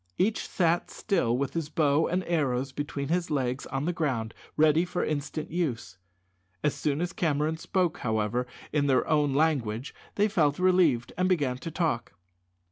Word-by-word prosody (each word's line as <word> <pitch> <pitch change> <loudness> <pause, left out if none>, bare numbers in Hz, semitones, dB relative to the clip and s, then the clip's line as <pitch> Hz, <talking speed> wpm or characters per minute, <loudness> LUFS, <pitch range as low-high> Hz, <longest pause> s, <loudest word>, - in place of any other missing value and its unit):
Each 210 +4 +1
sat 170 -1 +1
still 165 - 0
with 140 0 -2
his 165 -3 -2
bow 150 0 +2
and 180 +2 0
arrows 135 -6 0
between 140 0 -4
his 175 +1 0
legs 130 -3 -1
on 135 +2 -2
the 175 - 0
ground 125 -9 -1 0.2
ready 155 +2 +5
for 180 0 -2
instant 155 +1 -3
use. 120 - -2 0.6
As 150 - +2
soon 150 +1 -1
as 175 +1 -2
Cameron 155 -4 0
spoke, 175 0 0
however, 110 +2 0 0.3
in 145 -2 +2
their 130 -2 +2
own 150 -3 +2
language 135 -6 0 0.2
they 205 +1 +3
felt 150 -8 +2
relieved, 180 -10 +3
and 185 0 +2
began 140 -8 +1
to 165 - -5
talk. 160 -8 -1
150 Hz, 165 wpm, -28 LUFS, 130-170 Hz, 0.6 s, ready